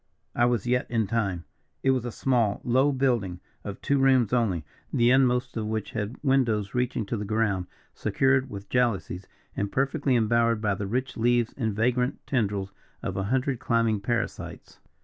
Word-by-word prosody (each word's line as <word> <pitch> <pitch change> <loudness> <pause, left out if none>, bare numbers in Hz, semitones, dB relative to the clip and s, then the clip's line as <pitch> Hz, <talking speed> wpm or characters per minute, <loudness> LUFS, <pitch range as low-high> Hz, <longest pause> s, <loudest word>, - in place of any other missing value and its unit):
I 120 - +3
was 120 -3 +1
yet 125 +1 0
in 115 -2 +1
time! 100 -5 -1 0.4
It 135 - +4
was 130 -2 0
a 120 - -3
small, 115 -5 +1
low 130 +4 +3
building 120 -10 0 0.2
of 100 -1 -6
two 140 -1 +2
rooms 130 -4 +4
only, 100 -10 +1 0.3
the 120 +1 +3
inmost 125 -1 +2
of 110 -1 -2
which 110 -1 -3
had 110 +2 -4
windows 120 -7 +1
reaching 125 -3 -1
to 115 - -3
the 105 - -3
ground, 105 -3 0 0.3
secured 135 0 +1
with 100 -3 -8
jalousies, 115 -6 0 0.3
and 100 0 -2
perfectly 140 0 +1
embowered 115 0 +2
by 105 -2 +1
the 100 +1 -4
rich 125 +4 -2
leaves 120 0 +2
and 110 -6 -2
vagrant 125 +3 0
tendrils 100 -6 -1 0.3
of - - -3
a 95 - -1
hundred 130 +2 0
climbing 115 -4 +1
parasites. 120 +2 -4
115 Hz, 170 wpm, -26 LUFS, 105-125 Hz, 0.4 s, It